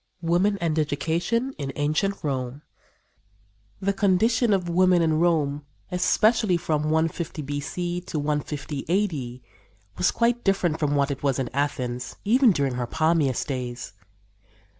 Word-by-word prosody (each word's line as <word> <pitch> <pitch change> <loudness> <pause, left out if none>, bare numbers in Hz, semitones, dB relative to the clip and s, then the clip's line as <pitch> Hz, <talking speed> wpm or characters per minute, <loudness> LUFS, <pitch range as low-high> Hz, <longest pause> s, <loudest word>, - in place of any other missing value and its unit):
WOMAN 180 +5 +2
AND 160 -3 0
EDUCATION 170 - -1
IN 140 -2 -3
ANCIENT 155 +7 -1
ROME 135 -1 -3 1.2
The 200 +1 0
condition 220 +4 +2
of 190 -3 +1
women 180 +1 +4
in 160 -1 +2
Rome, 150 -4 +1 0.3
especially 210 +2 +3
from 155 -3 -1
150 160 0 -1
B.C. 175 +5 -3
to - - -3
150 145 -1 -3
A.D., 145 -11 -1 0.6
was 90 - +4
quite 240 +1 +1
different 185 -5 +1
from 145 -2 +1
what 140 0 +1
it 135 - -5
was 140 -3 +1
in 130 -3 -2
Athens, 130 -3 -2
even 245 +3 +5
during 140 -6 0
her 125 -1 -3
palmiest 155 -3 +1
days. 125 -4 -5
160 Hz, 135 wpm, -25 LUFS, 140-185 Hz, 1.2 s, even